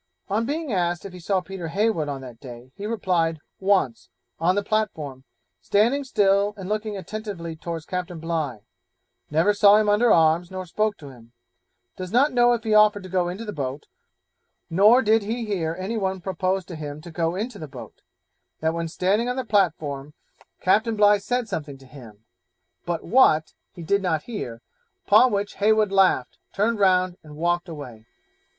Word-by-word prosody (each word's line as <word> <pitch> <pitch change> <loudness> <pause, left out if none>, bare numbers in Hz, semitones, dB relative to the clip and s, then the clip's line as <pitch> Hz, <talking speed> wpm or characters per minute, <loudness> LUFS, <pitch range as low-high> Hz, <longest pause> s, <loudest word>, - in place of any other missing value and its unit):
On 220 +4 0
being 300 -3 -3
asked 175 -1 -1
if 195 - -8
he 180 - -9
saw 185 +2 0
Peter 185 -2 -7
Heywood 195 -4 0
on 140 -2 -4
that 125 -3 -11
day, 125 -1 -11
he 205 +1 -6
replied, 180 -7 0 0.2
once, 190 - +1 0.3
on 180 +3 +2
the 205 - 0
platform, 155 -12 -2 0.4
standing 235 +8 +2
still 205 -4 +2
and 190 -2 -7
looking 215 0 -2
attentively 195 -5 -6
towards 165 0 -6
Captain 180 -1 -4
Bligh; 155 -8 -3 0.7
never 165 +7 +3
saw 205 0 +6
him 215 0 +2
under 210 +3 +4
arms 165 +1 +3
nor 185 0 -6
spoke 215 +4 -1
to 145 -3 -11
him; 120 -2 -17 0.6
does 185 -1 -6
not 270 +5 +3
know 240 0 +4
if 230 -1 -2
he 220 -2 0
offered 210 -2 +5
to 185 - -9
go 180 -1 0
in 180 - -5
the 210 - -5
boat, 140 0 -4 0.9
nor 210 +9 +6
did 220 +1 +4
he 225 +3 -3
hear 170 -6 -2
any 195 +5 -3
one 190 -2 -1
propose 185 +1 -2
to 175 - -8
him 150 -1 -6
to 170 +1 -11
go 165 +1 -1
in 215 +6 -2
the 200 -10 -9
boat; 135 -3 -11 0.6
that 160 +1 0
when 165 0 -3
standing 200 +8 0
on 250 - -1
the 260 -1 -3
platform, 155 - 0 0.5
Captain 220 +5 +2
Bligh 205 -1 +5
said 245 +3 -2
something 145 -7 -5
to 135 - -17
him, 115 -6 -14 0.6
but 170 -1 -2
what 165 -8 +4 0.2
he 175 - -10
did 200 +5 +1
not 160 -5 -1
hear, 120 - -6 0.4
upon 230 +5 +6
which 200 0 -2
Heywood 215 0 +3
laughed, 190 -9 +2
turned 215 +2 0
round, 185 -2 +3
and 150 -1 -13
walked 175 +3 -1
away. 125 -8 -9
185 Hz, 180 wpm, -24 LUFS, 160-210 Hz, 0.9 s, saw